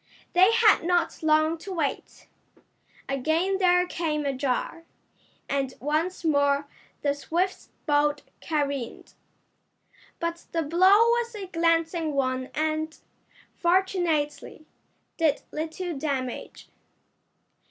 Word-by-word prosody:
They 370 +4 +6
had 455 -5 +5
not 350 -1 0
long 315 +1 +2
to 390 - -8
wait. 320 -6 -4 0.8
Again 320 +8 0
there 360 -1 +4
came 310 -4 -2
a 275 - 0
jar, 270 +5 -2 0.6
and 270 -2 -2
once 315 +6 -1
more 285 -2 +2 0.4
the 285 -1 +2
Swifts' 345 +6 -2 0.2
boat 295 -1 +2 0.2
careened. 280 -6 -3 1.1
But 335 0 -4
the 330 -1 +1
blow 365 +6 +5
was 475 -1 -1
a 405 -2 -5
glancing 330 -2 0
one 255 -1 -1
and, 315 +1 -1 0.6
fortunately, 340 -5 0 0.5
did 315 -4 +1
little 325 +2 -4
damage. 270 -3 -4
315 Hz, 100 wpm, -26 LUFS, 290-355 Hz, 1.1 s, They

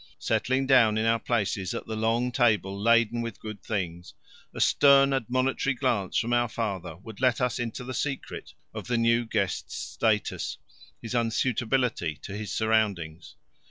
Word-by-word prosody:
Settling 130 +1 0
down 120 -5 +5
in 110 - 0
our 115 0 +2
places 100 -6 -1
at - - -5
the 110 - -5
long 115 +3 0
table 110 -6 +2
laden 115 +2 +2
with 115 -4 -6
good 105 -3 -8
things, 85 -6 -4 0.4
a - - -9
stern 140 -1 +5
admonitory 130 +1 0
glance 120 -7 0
from 120 +1 0
our 120 -1 +2
father 95 -7 -4
would 105 +4 -11
let 125 -3 +3
us 125 +1 0
into 120 +1 -4
the 130 +1 -6
secret 135 +3 -4 0.2
of - - -7
the 120 -1 0
new 115 +1 +3
guest's 100 -5 -2
status 105 +9 -1 0.4
his 115 - -7
unsuitability 120 - 0
to 100 - -6
his 105 -2 -5
surroundings. 100 -8 -1
115 Hz, 160 wpm, -27 LUFS, 100-125 Hz, 0.4 s, down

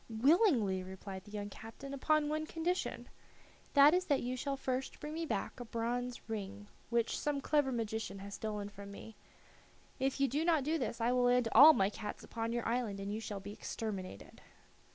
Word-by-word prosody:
"Willingly," 235 - +3
replied 190 +1 -8
the 205 - -13
young 205 -1 -5
captain, 225 +7 -9
"upon 300 +2 +2
one 310 +1 -2
condition. 345 +3 -2 0.7
That 285 +2 +8
is 365 +1 +2
that 285 -7 +1
you 250 +1 -2
shall 275 +2 -2
first 260 0 -3
bring 300 +1 -6
me 325 0 -3
back 220 0 -3
a 245 - -6
bronze 240 +2 -3
ring 205 -2 -5 0.2
which 235 -1 +1
some 295 -1 -1
clever 290 -1 +2
magician 220 -4 -3
has 200 +1 -8
stolen 210 -1 -4
from 200 0 -10
me. 210 +2 -10 0.8
If 270 +1 0
you 275 - +4
do 290 +5 0
not 325 -4 +3
do 315 +3 0
this 240 -2 -3
I 235 +2 +3
will 250 0 +3
land 245 -1 +3
all 295 +7 +10
my 195 -6 +2
cats 210 -1 -6
upon 230 0 -3
your 240 0 -2
island, 230 -4 -1
and 200 +1 -4
you 215 - -2
shall 205 -3 -5
be 200 +1 -7
exterminated." 195 - -6
235 Hz, 195 wpm, -34 LUFS, 210-280 Hz, 0.8 s, all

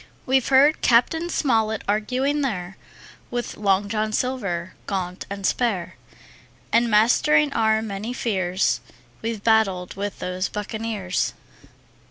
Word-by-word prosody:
We've 265 -1 +2
heard 280 +3 +5
Cap. 235 +4 +4
Smollett 225 -9 +1
arguing 255 +8 0
there 190 -8 -3 0.5
With 240 0 -4
Long 200 -1 +1
John 215 +1 -1
Silver, 200 -8 -2
gaunt 185 -2 -3
and 200 -1 -5
spare, 210 -8 0 0.8
And 235 0 +4
mastering 275 +7 +4
our 220 -2 +2
many 210 +2 -4
fears 190 - 0 0.4
We've 225 -2 -4
battled 195 -5 +2
with 200 +1 -4
those 180 0 -3
buccaneers. 210 -3 -3
215 Hz, 115 wpm, -23 LUFS, 195-240 Hz, 0.8 s, heard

